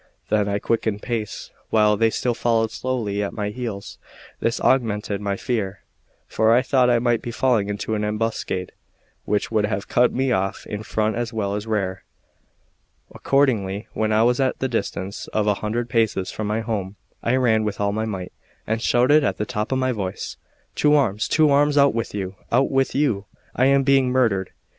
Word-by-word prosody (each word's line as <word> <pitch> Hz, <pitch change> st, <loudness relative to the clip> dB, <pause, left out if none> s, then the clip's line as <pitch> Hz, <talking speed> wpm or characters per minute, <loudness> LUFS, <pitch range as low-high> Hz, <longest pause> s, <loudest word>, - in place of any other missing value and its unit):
Then 105 Hz, -1 st, +2 dB
I 100 Hz, 0 st, 0 dB
quickened 110 Hz, -1 st, -1 dB
pace, 110 Hz, -4 st, -4 dB, 0.2 s
while 105 Hz, -1 st, +4 dB
they 115 Hz, +2 st, +3 dB
still 120 Hz, +2 st, -1 dB
followed 115 Hz, -1 st, +1 dB
slowly 115 Hz, -6 st, -2 dB
at 100 Hz, -, -3 dB
my 105 Hz, -2 st, -2 dB
heels; 110 Hz, -3 st, -6 dB, 0.4 s
this 115 Hz, +1 st, 0 dB
augmented 105 Hz, -5 st, +1 dB
my 100 Hz, -1 st, -2 dB
fear, 100 Hz, -5 st, -3 dB, 0.4 s
for 110 Hz, 0 st, +2 dB
I 120 Hz, +2 st, +5 dB
thought 130 Hz, -2 st, +3 dB
I 120 Hz, -, +4 dB
might 120 Hz, -1 st, +1 dB
be -, -, -6 dB
falling 115 Hz, -4 st, +1 dB
into 105 Hz, +2 st, -3 dB
an 105 Hz, -1 st, -1 dB
ambuscade, 105 Hz, -3 st, -2 dB, 0.5 s
which 105 Hz, +1 st, -1 dB
would 105 Hz, -2 st, +2 dB
have 100 Hz, -1 st, -3 dB
cut 125 Hz, 0 st, +3 dB
me 130 Hz, 0 st, 0 dB
off 95 Hz, -2 st, -1 dB
in 105 Hz, -, -5 dB
front 110 Hz, 0 st, -1 dB
as 120 Hz, -1 st, -2 dB
well 100 Hz, -3 st, -1 dB
as 105 Hz, +2 st, -4 dB
rear. 95 Hz, -4 st, -2 dB, 1.1 s
Accordingly, 110 Hz, -8 st, +1 dB
when 110 Hz, 0 st, 0 dB
I 110 Hz, +1 st, +4 dB
was 125 Hz, +2 st, +2 dB
at 130 Hz, -1 st, +1 dB
the 130 Hz, -, -1 dB
distance 100 Hz, -4 st, -3 dB
of 105 Hz, -1 st, +1 dB
a 105 Hz, -, +3 dB
hundred 115 Hz, +3 st, -2 dB
paces 110 Hz, -6 st, 0 dB
from 110 Hz, -, -4 dB
my 110 Hz, +2 st, -1 dB
home, 105 Hz, -4 st, -3 dB, 0.3 s
I 120 Hz, -, +1 dB
ran 115 Hz, -4 st, +3 dB
with 105 Hz, -2 st, -3 dB
all 100 Hz, 0 st, +1 dB
my 110 Hz, +2 st, -1 dB
might, 95 Hz, -5 st, -5 dB, 0.3 s
and 110 Hz, +1 st, -1 dB
shouted 130 Hz, +5 st, +4 dB
at 95 Hz, -8 st, 0 dB
the 105 Hz, -, -2 dB
top 105 Hz, -2 st, -3 dB
of 130 Hz, -, +1 dB
my 130 Hz, 0 st, +1 dB
voice: 95 Hz, -6 st, -4 dB, 0.4 s
"To 150 Hz, 0 st, +4 dB
arms, 110 Hz, -7 st, +1 dB
to 155 Hz, -2 st, +3 dB
arms! 145 Hz, +1 st, +3 dB
out 140 Hz, 0 st, +5 dB
with 115 Hz, -2 st, -3 dB
you, 95 Hz, -1 st, -4 dB
out 130 Hz, +3 st, +3 dB
with 135 Hz, 0 st, +1 dB
you! 130 Hz, -9 st, +1 dB, 0.3 s
I 130 Hz, -, +3 dB
am 140 Hz, 0 st, +4 dB
being 135 Hz, -2 st, +3 dB
murdered." 115 Hz, -7 st, +1 dB
110 Hz, 195 wpm, -22 LUFS, 105-125 Hz, 1.1 s, I